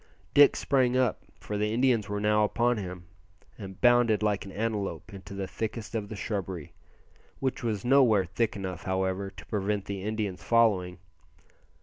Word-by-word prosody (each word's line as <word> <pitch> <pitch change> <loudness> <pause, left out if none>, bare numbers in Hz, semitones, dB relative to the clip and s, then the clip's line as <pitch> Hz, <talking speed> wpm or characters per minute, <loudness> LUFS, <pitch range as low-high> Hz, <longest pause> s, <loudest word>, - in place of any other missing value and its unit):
Dick 145 0 +7
sprang 130 -2 +2
up, 130 -3 +1 0.2
for 105 -1 -4
the 105 0 0
Indians 115 -3 +2
were 105 0 -2
now 105 +1 +3
upon 120 +3 +1
him, 90 -3 -6 0.5
and 95 -3 -9
bounded 120 -4 +4
like 105 -2 0
an 100 - -9
antelope 105 -3 -3
into 100 0 -9
the 100 0 -3
thickest 110 +3 -5
of 105 -3 -3
the 110 - -6
shrubbery; 95 -6 -4 0.7
which 130 -1 -2
was 110 -4 -2
nowhere 120 -7 +5
thick 105 +6 -1
enough, 95 -3 -5
however, 95 +1 -1
to - - -13
prevent 105 -1 -2
the 100 -1 -5
Indians 105 -2 -3
following. 100 -7 +2
105 Hz, 160 wpm, -28 LUFS, 95-115 Hz, 0.7 s, Dick